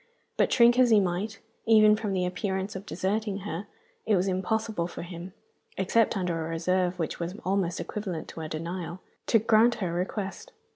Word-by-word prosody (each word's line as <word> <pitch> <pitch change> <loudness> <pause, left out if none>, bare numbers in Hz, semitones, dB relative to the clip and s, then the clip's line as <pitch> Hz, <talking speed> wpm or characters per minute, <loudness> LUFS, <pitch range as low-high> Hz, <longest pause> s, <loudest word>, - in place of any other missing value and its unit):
But - - +2
shrink 240 0 +5
as 250 -1 +6
he 220 -2 +6
might, 190 +3 -2 0.3
even 215 -1 +7
from 210 -2 -3
the 180 -1 +1
appearance 190 +2 -2
of 190 +2 -7
deserting 200 +2 -2
her, 195 0 -5 0.4
it 215 - +4
was 185 +1 +1
impossible 190 0 -1
for 175 - -7
him 175 +1 -8 0.5
(except 215 +3 +2
under 175 -3 -1
a 160 - -5
reserve 180 +2 0
which 160 -3 -3
was 175 +2 -4
almost 185 -2 0
equivalent 190 -6 -4
to 165 - -7
a 155 - -5
denial) 170 +3 -5 0.3
to 225 - +5
grant 225 +2 +4
her 180 -5 -3
request. 195 - -4
190 Hz, 180 wpm, -28 LUFS, 175-215 Hz, 0.5 s, even